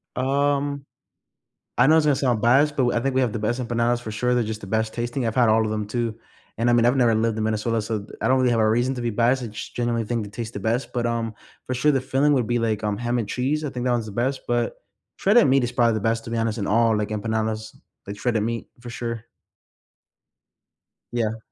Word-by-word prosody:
Um, 140 +1 0 0.9
I 125 - +5
know 155 +2 +6
it's 160 -1 +3
gonna 145 -2 +3
sound 125 -5 +1
biased 135 +6 +4
but 130 - +2
w 120 -1 +1
I - - -2
think 135 +2 -1
we 130 - +3
have 125 -4 +1
the 115 - -3
best 115 +4 -1
empanadas, 120 0 0
for 110 - -6
sure, 125 +4 0
they're 120 - +2
just 110 0 -5
the 100 - -9
best 110 +2 -1
tasting, 120 +1 -2
I've 115 - -1
had 125 -3 +4
all 110 +1 +4
of 110 - -2
them, 105 -1 -2
too, 115 +1 -2 0.4
and, 115 +1 +1
I - - +4
mean, 120 -1 +4
I've 125 +3 +3
never 120 -3 +4
lived 110 0 0
in 110 - -1
Minnesota, 110 +1 0
so 110 0 -3
th 100 - -14
I 110 - 0
don't 130 +1 +4
really 130 -1 +3
have 115 - +2
a 110 - +3
reason 120 +4 +1
to - - -4
be 120 -1 -1
biased, 120 +4 +2
I - - -4
just 105 - -8
generally 120 -1 0
think 115 0 -2
they 100 - -9
taste 115 +1 -6
the 100 - -4
best, 115 +6 -1
but, 120 -1 -1
um, 115 -1 -2 0.3
for 130 - -2
sure, 150 +5 +3
the 135 - +1
filling 135 +3 +2
would 125 -4 +1
be 120 0 +1
like, 110 -2 -1
um, 105 -1 0
ham 120 +1 -1
and 110 -4 -3
cheese, 140 +7 -1
I 145 - -2
think 125 -2 -4
that 125 - +2
one's 120 -2 -1
the 105 - -8
best, 130 +5 -1
but 120 -1 0 0.4
shredded 220 +4 +4
meat 135 0 +4
is 120 - -3
probably 115 -2 +3
the 110 - -1
best, 115 +2 0
to - - -7
be 115 - -2
honest, 115 0 -1
in 100 - -2
all, 115 +1 +3
like, 105 0 -1
empanadas, 110 0 -2 0.3
like, 100 +1 -7
shredded 115 -3 0
meat, 115 +1 -3
for 120 0 -9
sure. 115 -1 -5 1.9
Yeah. 115 -2 -1
120 Hz, 265 wpm, -23 LUFS, 110-125 Hz, 1.9 s, know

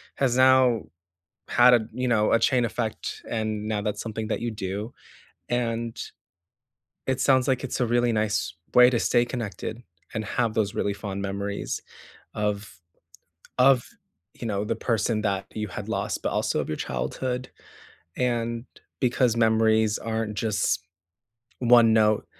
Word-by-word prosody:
has 130 -3 +1
now 130 -3 +5 0.7
had 120 +1 +6
a, 120 - +5
you 125 +1 -1
know, 110 -3 +2
a - - +5
chain 125 0 +2
effect, 115 -1 -4
and 110 -2 -2
now 110 -1 -1
that's 105 0 -3
something 110 -1 -4
that - - -2
you 120 - -2
do, 105 +1 -5 0.6
and 115 -1 -1 1.1
it 130 0 -1
sounds 130 -2 +3
like 130 -1 +1
it's 130 - -3
a 125 - +2
really 120 +1 +2
nice 105 -6 0 0.2
way 125 0 +8
to 120 -2 0
stay 120 +1 +3
connected 115 -1 -5 0.3
and 110 -1 -2
have 115 +2 0
those 105 -2 0
really 100 - 0
fond 100 -1 -5
memories 100 +1 -3 0.5
of 105 -3 -3 0.8
of, 125 -1 +5 0.5
you 120 - -7
know, 105 -2 -1
the - - -2
person 115 -2 0
that 100 -2 -1
you 105 0 -3
had - - -7
lost, - - -2
but - - -1
also - - 0
of - - -4
your 75 - -2
childhood, 125 - -3 0.7
and 120 -2 -1 0.4
because 125 -2 +2
memories 110 -1 +3
aren't 110 -1 -3
just 100 -5 0 0.8
one 120 -2 +6
note, 110 -1 +3
115 Hz, 150 wpm, -25 LUFS, 105-120 Hz, 1.1 s, way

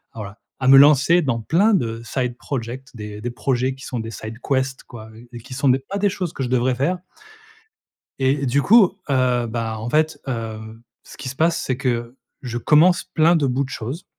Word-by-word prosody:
voilà 105 -1 -8 0.2
à 130 - -1
me 135 - +9
lancer 145 +4 +5
dans 130 -7 -1
plein 190 - +2
de 115 -9 -2
side 125 -1 -2
project, 130 0 -6
des 105 -1 -8
des 120 +2 -4
projets 130 +1 -1
qui 135 - -12
sont 125 - -4
des 110 0 -6
side 110 0 -8
quest 130 -1 -1
quoi, 110 -2 -11
heu, 115 +2 -15
et 120 - -7
qui 130 +3 -11
sont 140 +1 +1
des 130 +1 +3
pas 165 +9 -6
des 205 0 +2
choses 180 -4 -4
que - - -6
je 125 - -3
devrais 125 0 +1
faire 145 +9 0 1.2
et 135 +1 +1
du 140 +3 +2
coup, 200 -2 +5
heu, 125 -3 +1
bah, 115 -1 -3
en 110 +2 -5
fait, 155 0 +1
hem, 115 -2 -6 0.2
ce - - -14
qui 130 - -7
se 130 - -7
passe 165 +2 +1
c'est 130 - -2
que, 120 -1 -2 0.3
je 120 -2 -4
commence 165 +7 +4
plein 165 +2 +3
de 150 -4 +1
bouts 130 +1 0
de 135 - -5
choses, 130 - -6
130 Hz, 215 wpm, -21 LUFS, 115-145 Hz, 1.2 s, me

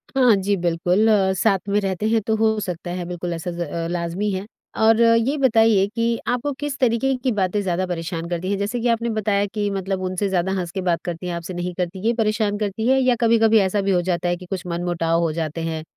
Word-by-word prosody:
हाँ, 250 -5 +5
जी 200 +1 0
बिल्कुल। 175 +4 +1 0.3
साथ 195 -1 +2
में 205 +1 +2
रहते 195 +1 -2
हैं 225 0 +2
तो 220 - +2
हो 220 0 +2
सकता 175 -3 -5
है, 180 -1 -4
बिल्कुल 175 0 -4
ऐसा 170 +1 -4
ज़ 175 0 -6 0.3
लाज़मी 175 +4 -2
है। 190 +1 -3 0.3
और 220 +1 +4
ये 230 +5 +3
बताइए 225 -6 +4
कि 230 0 +1
आपको 250 +4 0
किस 290 -1 -3
तरीके 255 +2 +2
की 255 - +2
बातें 205 0 0
ज़्यादा 185 -1 -1
परेशान 165 -1 -4
करती 175 +2 -3
हैं? 200 - 0
जैसे 210 +5 -2
कि 245 - 0
आपने 235 0 +1
बताया 210 -2 0
कि 205 -1 -1
मतलब 195 -1 -2
उनसे 185 +2 -1
ज़्यादा 185 0 0
हँस 175 -2 -4
के 190 0 -3
बात 175 -2 0
करती 175 +1 -4
हैं 175 - -3
आपसे 170 +2 -6
नहीं 175 0 -4
करती, 180 +1 -3
ये 235 - +3
परेशान 215 -2 0
करती 215 +2 -2
है 265 +1 +4
या 255 -1 +3
कभी-कभी 225 -1 +4
ऐसा 195 +1 +1
भी 195 0 0
हो 180 - +3
जाता 175 0 -1
है 175 - +1
कि 180 - -11
कुछ 185 0 -5
मनमुटाव 170 -1 0
हो 165 -2 +1
जाते 160 0 -3
हैं 160 -1 -3
195 Hz, 235 wpm, -22 LUFS, 175-225 Hz, 0.3 s, हाँ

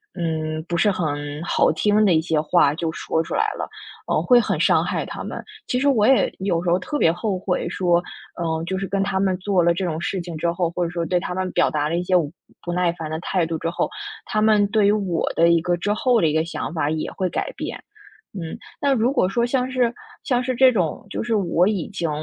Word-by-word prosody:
嗯， 155 -2 -2
不 175 - -2
是 205 +5 +3
很 145 -4 -3
好 - - +2
听 210 +6 +2
的 185 -5 +4
一 - - +4
些 160 -2 0
话 150 -2 +3
就 165 0 -2
说 160 - -1
出 - - -4
来 440 - +2 0.2
了， - - -4 0.4
呃， - - +2
会 245 -2 +6
很 - - -1
伤 - - +4
害 - - -2
他 - - -7
们。 - - -6 0.3
其 250 - 0
实 285 - +1
我 225 -7 +4
也 265 - +4
有 180 -3 0
时 180 - 0
候 180 - +3
特 295 +10 -3
别 165 - +4
后 185 +2 -2
悔 180 -2 -2
说， 175 -1 +2 0.4
嗯， 160 -1 -1
就 190 - -2
是 195 - -3
跟 195 0 0
他 195 -1 -1
们 190 -1 +1
做 190 -1 +1
了 170 - +4
这 180 +2 -1
种 160 -1 -3
事 190 - -2
情 170 -2 -6
之 170 +2 0
后， 170 -1 -1
或 175 +1 -2
者 170 - -1
说 170 -1 -3
对 180 +1 +1
他 180 +1 -4
们 185 -1 -2
表 - - +2
达 150 -1 -1
了 165 - -1
一 175 - -1
些 185 0 +1
我 170 -4 +3 0.4
不 175 - -2
耐 180 -1 +2
烦 160 -2 -6
的 160 - -3
态 180 0 0
度 165 0 -3
之 165 - -2
后， 170 - -1 0.4
他 215 - -1
们 215 -1 +4
对 205 -1 +3
于 - - +5
我 195 -6 0
的 170 +1 +4
一 170 -1 +4
个 175 +1 0
之 205 +4 0
后 245 +2 +2
的 165 - +3
一 150 - 0
个 160 0 +2
想 165 -2 -5
法 150 -3 0
也 155 0 -2
会 185 -1 -2
改 - - -3
变。 - - -6 0.6
嗯， 165 -2 -5 0.2
那 280 -1 +2
如 245 +1 +2
果 230 - +2
说 235 +5 0
像 255 +1 -1
是 245 -2 +2 0.3
像 250 -2 +1
是 255 0 -1
这 260 +1 +6
种， 185 -3 -2
就 - - -3
是 235 - -1
我 180 -2 +2
已 200 -6 -1
经 175 -5 -3
180 Hz, 280 characters per minute, -22 LUFS, 165-205 Hz, 0.6 s, 会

